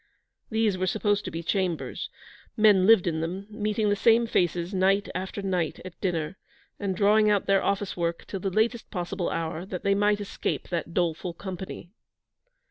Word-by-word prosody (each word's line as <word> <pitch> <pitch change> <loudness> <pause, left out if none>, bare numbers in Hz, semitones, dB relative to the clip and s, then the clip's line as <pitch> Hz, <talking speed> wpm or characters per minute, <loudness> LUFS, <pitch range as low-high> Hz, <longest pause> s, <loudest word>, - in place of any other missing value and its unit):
These 220 -4 +1
were 185 - 0
supposed 205 +2 +1
to - - -3
be 165 +1 -5
chambers. 180 -2 -2 0.5
Men 205 -3 +5
lived 225 -5 +7
in 160 -2 -1
them, 180 +4 -4
meeting 210 0 0
the 205 - +3
same 230 +3 +4
faces 175 -3 0
night 195 +2 +2
after 190 +2 -4
night 180 -5 -1
at 185 - -10
dinner, 170 -1 -1 0.4
and 195 -2 -1
drawing 210 +2 +4
out 205 -2 +2
their 195 -1 +3
office 200 0 -1
work 170 -1 -2
till 195 - -5
the 195 - -1
latest 220 +4 0
possible 180 -1 -3
hour, 165 0 -3
that 185 -2 -6
they 200 - +3
might 205 +1 +2
escape 205 - -3
that 170 -1 -3
doleful 170 0 -1
company. 185 -1 -7
190 Hz, 175 wpm, -27 LUFS, 175-205 Hz, 0.5 s, lived